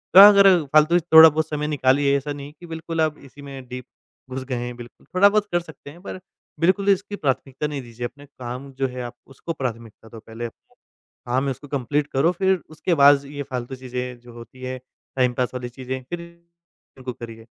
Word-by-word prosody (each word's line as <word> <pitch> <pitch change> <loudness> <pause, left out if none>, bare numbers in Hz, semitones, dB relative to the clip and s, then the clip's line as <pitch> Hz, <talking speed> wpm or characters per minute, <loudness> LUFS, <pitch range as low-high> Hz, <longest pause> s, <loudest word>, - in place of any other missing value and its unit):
थोड़ा 195 +2 +13
अगर 200 -1 +7 0.2
फ़ालतू 155 +3 +5
से 165 - -13
थोड़ा-बहुत 160 -1 +8
समय 150 0 -2
निकालिए 140 -1 +2
ऐसा 145 +1 -4
नहीं 140 -1 -8
है 145 - -14
कि 175 - -11
बिल्कुल 165 0 -3
आप 155 -1 0
इसी 140 +1 -14
में 135 -2 -9
डीप 125 0 -7 0.4
घुस 130 0 -5
गए 130 -1 -3
हैं 120 0 -4
बिल्कुल, 120 0 -13
थोड़ा-बहुत 200 +2 +5
कर 175 - +2
सकते 160 -4 -13
हैं 165 +5 -14
पर 185 - -7 0.4
बिल्कुल 195 +4 +2
इसकी 200 +1 +1
प्राथमिकता 135 -2 -2
नहीं 145 -2 -4
दीजिए 120 0 -7
अपने 145 +4 -16
काम 130 0 -8
जो 135 - +2
है 125 0 -6
आप 120 0 -6
उसको 135 +5 -6
प्राथमिकता 115 -5 -6
दो 115 - -10
पहले 115 +1 -8
अप 115 - -5 0.7
काम 130 +3 0
है 140 - 0
उसको 135 +3 -9
कंप्लीट 145 +1 -1
करो 140 +6 +3
फिर 190 +1 +1
उसके 155 +3 -2
बाद 145 -1 +8
ज़ 140 - -13
ये 145 0 -6
फालतू 125 -1 -5
चीज़ें 125 -1 -6
जो 120 0 -15
होती 120 +2 -13
हैं 130 0 -4 0.4
टाइमपास 125 -1 +1
वाली 125 -1 -5
चीज़ें 130 +1 -6
फ़िर 175 -1 -4 0.8
इनको 130 -1 -6
करिए। 115 -1 -10
135 Hz, 210 wpm, -23 LUFS, 125-155 Hz, 0.8 s, थोड़ा